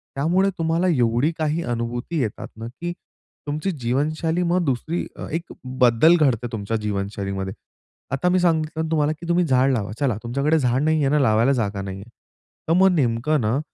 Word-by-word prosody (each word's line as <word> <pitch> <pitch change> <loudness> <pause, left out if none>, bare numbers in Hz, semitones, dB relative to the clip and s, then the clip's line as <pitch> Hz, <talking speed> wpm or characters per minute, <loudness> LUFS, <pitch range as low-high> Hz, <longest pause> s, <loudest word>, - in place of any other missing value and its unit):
त्यामुळे 175 +8 +2
तुम्हाला 165 +2 +1
एवढी 125 0 +2
काही 155 +1 -1
अनुभूती 120 +6 -3
येतात 110 -4 -4
ना, 115 - -7
की 175 +8 -6 0.5
तुमची 155 +6 -2
जीवनशैली 155 +7 0
मग 180 +1 +2
दुसरी 150 +6 -1
अ, - - -7
एक 165 +2 -4 0.3
बदल 125 +8 +6
घडते 125 -6 +1
तुमच्या 110 0 -2
जीवनशैलीमध्ये. 100 -1 -3 0.6
आता 140 +6 +1
मी 185 - +3
सांगितलं 160 -2 0
तुम्हाला, 150 -1 +2
की 170 - -8
तुम्ही 175 +1 +3
झाड 130 -2 +3
लावा. 105 -4 -2
चला 125 -7 +1
तुमच्याकडे 140 +7 +1
झाड 125 0 +1
नाहीये 155 -3 +2
ना 150 +1 +3
लावायला 115 -1 +3
जागा 100 -1 -2
नाहीये. 95 +1 -7 0.6
तर 165 - +4
मग 190 +2 +5
नेमकं 135 +2 +1
ना, 110 +5 +1
140 Hz, 165 wpm, -22 LUFS, 115-160 Hz, 0.6 s, बदल